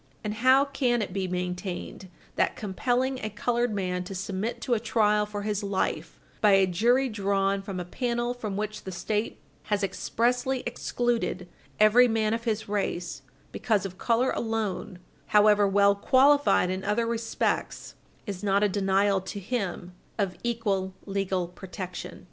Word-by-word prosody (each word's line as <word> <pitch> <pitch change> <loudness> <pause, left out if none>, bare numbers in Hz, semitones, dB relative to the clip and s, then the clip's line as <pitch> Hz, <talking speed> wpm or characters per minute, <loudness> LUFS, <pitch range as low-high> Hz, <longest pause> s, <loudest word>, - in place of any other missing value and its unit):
And 210 -1 -2
how 260 +5 +5
can 250 -5 0
it 185 - -6
be 190 -1 -1
maintained 180 +1 -4 0.3
that - - +1
compelling 245 +6 -1
a 215 - -1
colored 240 +3 0
man 180 -3 -2
to 195 - -7
submit 195 +4 -3
to 250 - 0
a 230 - +2
trial 210 -2 +2
for 205 -1 -5
his 210 -1 -1
life 200 -2 -2 0.2
by 210 -2 +5
a 195 0 +6
jury 235 +9 +2
drawn 200 -3 0
from 195 -2 -5
a 180 - -4
panel 240 +4 -1
from 215 -5 -5
which 215 0 -4
the 190 - -6
State 210 +4 -2 0.3
has 205 -1 0
expressly 245 +6 0
excluded 240 -6 -1 0.3
every 220 +4 +6
man 220 -1 +1
of 230 +1 -3
his 220 -2 -1
race, 200 -4 -2 0.3
because 210 -5 0
of 185 0 -7
color 240 +2 +2
alone, 220 -5 -3 0.3
however 210 -1 +5
well 200 +1 +4
qualified 265 -1 +4
in 185 +1 -3
other 210 +3 +1
respects, 230 0 -2 0.3
is 195 -3 -6
not 200 0 +2
a - - +5
denial 195 0 +2
to 190 +2 -6
him 190 -4 -3 0.2
of 195 -4 -1
equal 200 -6 -1
legal 195 -3 -1
protection? 185 +1 -8
210 Hz, 155 wpm, -27 LUFS, 195-235 Hz, 0.3 s, a